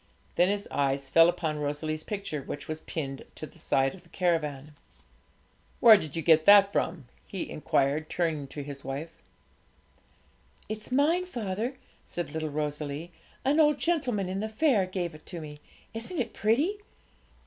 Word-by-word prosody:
Then 175 - +4
his 205 0 -1
eyes 140 -1 0
fell 165 +1 +7
upon 155 -3 -2
Rosalie's 155 +2 -2
picture, 200 -8 -4
which 145 - -7
was 155 0 -4
pinned 135 -4 -5
to - - -6
the - - -16
side 135 0 +1
of 190 - -13
the 170 - -23
caravan. 155 -5 -1 1.1
'Where 230 -2 +10
did 155 -7 -3
you 165 - -2
get 160 0 +5
that 200 -1 +8
from?' 165 -6 -1 0.2
he 190 - -4
inquired, 150 +1 0
turning 160 -5 -1
to 145 +1 -6
his 140 -1 -8
wife. 145 +5 -5 1.6
'It's 215 +2 -5
mine, 320 +7 +2
father,' 235 - -3 0.3
said 175 - -5
little 160 -1 -3
Rosalie; 150 +2 -3 0.3
'an 285 +4 +3
old 300 -2 +5
gentleman 255 - 0
in 190 +1 -3
the 220 +1 -2
fair 220 -5 +2
gave 180 -3 -3
it 155 - -15
to 175 - -6
me. 150 -2 -9 0.3
Isn't 230 +11 -4
it 235 -2 -2
pretty?' 285 - +1
170 Hz, 160 wpm, -28 LUFS, 150-215 Hz, 1.6 s, Where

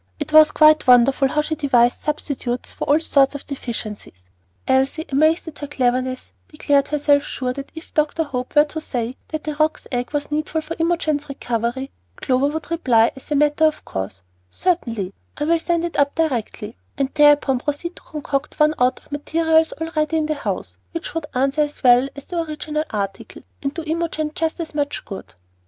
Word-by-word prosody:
It - - -5
was 310 -1 +9
quite 310 -1 +5
wonderful 255 +2 +5
how 300 +3 0
she 310 - -2
devised 250 -5 +2
substitutes 280 -5 -3
for - - -5
all 295 +2 +4
sorts 280 -3 +3
of 285 - -7
deficiencies. 215 - -6 0.4
Elsie, 265 +4 +1
amazed 310 +5 +3
at 310 - -9
her 290 - -5
cleverness, 255 -2 -1 0.2
declared 285 -2 +1
herself 290 -1 +3
sure 255 -3 -3
that 275 +1 -8
if 320 - -11
Dr. 305 +2 +1
Hope 250 -3 -5
were 295 - +8
to 315 +1 -6
say 245 -4 -3
that 310 0 -5
a 305 - -1
roc's 310 +1 0
egg 245 -1 -2
was 290 0 -3
needful 310 +1 -1
for 325 +1 -6
Imogen's 315 -3 0
recovery, 245 0 -3 0.2
Clover 260 +2 +1
would 310 +1 -5
reply, 240 -9 +3
as 270 - -12
a 300 - +1
matter 295 +2 +3
of 310 -1 0
course, 95 0 -5 0.3
"Certainly, 230 - -1 0.2
I 295 - -2
will 335 +2 +2
send 340 0 0
it 345 - -4
up 285 0 +2
directly," 240 -8 -2 0.2
and 275 0 0
thereupon 295 -3 +5
proceed 295 +6 -3
to - - -11
concoct 295 -2 -4
one 305 0 +5
out 250 +1 +3
of - - -25
materials 320 +2 +2
already 320 -1 -1
in 310 - +1
the 310 - 0
house, 285 - -4 0.2
which 335 -1 -5
would 325 -3 -3
answer 270 +3 +1
as 295 0 -3
well 250 +1 +6
as 280 - -10
the 345 -2 -2
original 305 -1 -3
article 200 -2 -5 0.2
and 275 - -1
do 330 - -4
Imogen 315 -1 -2
just 325 +1 -2
as 325 -2 -5
much 290 -1 -2
good. 195 - -9
290 Hz, 190 wpm, -21 LUFS, 260-310 Hz, 0.4 s, was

